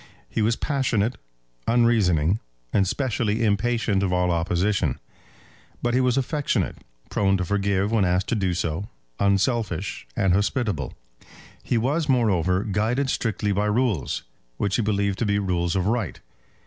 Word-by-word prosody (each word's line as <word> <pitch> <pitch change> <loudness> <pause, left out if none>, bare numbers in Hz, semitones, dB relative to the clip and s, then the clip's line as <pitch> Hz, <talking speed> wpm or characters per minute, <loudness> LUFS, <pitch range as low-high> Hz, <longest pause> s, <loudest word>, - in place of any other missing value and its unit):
He - - -2
was 115 +2 +2
passionate, 125 -5 0 0.5
unreasoning, 105 -7 +3 0.3
and 95 -1 +3
specially 115 -2 0
impatient 105 -1 +1
of 95 -2 0
all 90 0 +2
opposition; 85 -2 0 0.8
but 120 0 +1
he 130 - +3
was 125 0 +2
affectionate, 145 +2 0 0.3
prone 95 -1 +2
to 90 - -2
forgive 100 +1 0
when 110 -3 +3
asked 90 +1 +1
to - - +1
do 95 -4 0
so, 85 +3 -2 0.3
unselfish, 100 - 0
and 95 -2 +2
hospitable. 100 - 0 0.7
He 120 - 0
was, 145 +7 0
moreover, 95 -7 +2
guided 115 +6 0
strictly 105 -3 -1
by 100 +2 +1
rules, 105 - 0 0.3
which 100 -1 0
he - - +2
believed 100 -2 0
to 115 - +1
be 100 0 +2
rules 90 -3 0
of 95 -1 +1
right. 110 -4 -1
100 Hz, 145 wpm, -24 LUFS, 95-115 Hz, 0.8 s, unreasoning